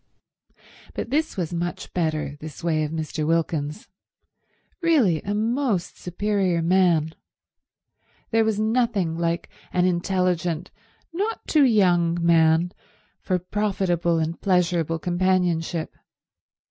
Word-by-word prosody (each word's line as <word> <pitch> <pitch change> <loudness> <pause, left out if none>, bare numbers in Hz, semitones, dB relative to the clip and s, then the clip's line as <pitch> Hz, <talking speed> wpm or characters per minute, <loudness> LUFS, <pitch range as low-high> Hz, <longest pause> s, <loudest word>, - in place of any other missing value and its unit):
But - - -4
this 310 -2 0
was 175 -2 -2
much 175 +1 -4
better, 155 -4 -1
this 155 0 -9
way 160 -2 +1
of 150 - -2
Mr. 160 -1 -3
Wilkins's. 160 0 -1 0.9
Really 265 - +3
a 205 +1 -3
most 225 -3 -1
superior 185 -2 0
man. 170 -3 +3 1.2
There 225 0 +4
was 220 -1 0
nothing 220 -6 +1
like 170 0 -1 0.2
an 180 0 +2
intelligent, 180 -1 0 0.4
not 415 +6 -3
too 300 -3 +4
young 175 -7 +3
man 165 0 +3 0.5
for 185 - 0
profitable 180 -3 0
and 160 +1 -2
pleasurable 175 -4 +1
companionship. 175 -1 0
175 Hz, 110 wpm, -24 LUFS, 165-200 Hz, 1.2 s, There